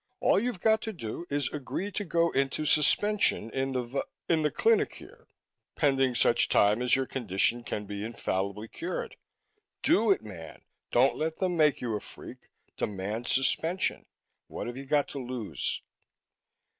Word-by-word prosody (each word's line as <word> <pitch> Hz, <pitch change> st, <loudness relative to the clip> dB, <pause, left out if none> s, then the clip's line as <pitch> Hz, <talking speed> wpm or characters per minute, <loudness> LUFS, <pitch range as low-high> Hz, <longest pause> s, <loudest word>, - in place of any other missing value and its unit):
All -, -, +4 dB
you've 230 Hz, -4 st, -3 dB
got 220 Hz, 0 st, +3 dB
to 220 Hz, -2 st, -4 dB
do 165 Hz, -, -6 dB
is 145 Hz, -1 st, 0 dB
agree 150 Hz, +8 st, -4 dB
to 205 Hz, -, -2 dB
go 170 Hz, -1 st, +1 dB
into 140 Hz, +3 st, 0 dB
suspension 155 Hz, -, +3 dB
in 135 Hz, 0 st, -2 dB
the 125 Hz, -1 st, -1 dB
va 130 Hz, +4 st, -3 dB, 0.2 s
in 165 Hz, -2 st, +2 dB
the 150 Hz, -, +2 dB
clinic 450 Hz, -, +2 dB
here, -, -, -14 dB, 0.5 s
pending 135 Hz, -4 st, +2 dB
such 120 Hz, 0 st, +3 dB
time 105 Hz, +3 st, +4 dB
as 125 Hz, -1 st, +4 dB
your 135 Hz, 0 st, 0 dB
condition 120 Hz, -1 st, 0 dB
can 105 Hz, -2 st, -4 dB
be 100 Hz, 0 st, -5 dB
infallibly 105 Hz, -2 st, -3 dB
cured. 175 Hz, +10 st, -5 dB, 0.7 s
Do 230 Hz, -9 st, +4 dB
it, 195 Hz, -, +3 dB
man! 90 Hz, -7 st, -10 dB, 0.3 s
Don't 130 Hz, +3 st, +3 dB
let 160 Hz, +1 st, -1 dB
them 185 Hz, -2 st, 0 dB
make 150 Hz, -3 st, +3 dB
you 115 Hz, -3 st, -2 dB
a -, -, -2 dB
freak -, -, -12 dB, 0.3 s
demand 105 Hz, +4 st, -3 dB
suspension! 165 Hz, +7 st, +1 dB, 0.4 s
What -, -, -6 dB
have 120 Hz, -, -5 dB
you 135 Hz, +1 st, -7 dB
got 145 Hz, 0 st, +2 dB
to 140 Hz, -, -6 dB
lose?" 120 Hz, -, -4 dB
135 Hz, 165 wpm, -29 LUFS, 115-165 Hz, 0.7 s, All